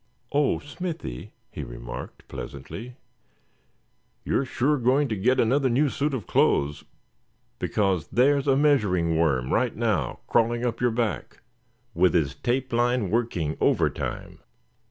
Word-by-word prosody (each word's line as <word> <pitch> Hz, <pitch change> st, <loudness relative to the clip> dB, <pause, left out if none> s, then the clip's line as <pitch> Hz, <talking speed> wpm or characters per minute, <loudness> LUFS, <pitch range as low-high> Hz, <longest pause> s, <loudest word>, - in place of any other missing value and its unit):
"Oh! 145 Hz, 0 st, +2 dB
Smithy," 150 Hz, -, -6 dB, 0.2 s
he -, -, -6 dB
remarked, -, -, -8 dB
pleasantly, 100 Hz, -, -8 dB, 1.3 s
"you're 135 Hz, -, +1 dB
sure 140 Hz, +3 st, +1 dB
going 130 Hz, +4 st, +3 dB
to 110 Hz, -, -1 dB
get 120 Hz, +7 st, +2 dB
another 130 Hz, +3 st, +3 dB
new 140 Hz, +5 st, +2 dB
suit 140 Hz, +1 st, -1 dB
of 115 Hz, -, -5 dB
clothes, 75 Hz, +1 st, +1 dB, 0.8 s
because 95 Hz, -6 st, 0 dB
there's 140 Hz, +3 st, +2 dB
a 135 Hz, -, +4 dB
measuring 105 Hz, -, +2 dB
worm 70 Hz, -6 st, +1 dB
right 125 Hz, -1 st, +1 dB
now, 105 Hz, -, -1 dB
crawling 120 Hz, +1 st, +1 dB
up 115 Hz, -1 st, -2 dB
your 125 Hz, -, +3 dB
back, 115 Hz, -3 st, -3 dB, 0.5 s
with 90 Hz, -, +3 dB
his 75 Hz, -5 st, +2 dB
tape 125 Hz, -, -2 dB
line 120 Hz, -4 st, +1 dB
working 100 Hz, -10 st, 0 dB
over -, -, +3 dB
time." -, -, -6 dB
120 Hz, 135 wpm, -25 LUFS, 90-130 Hz, 1.3 s, a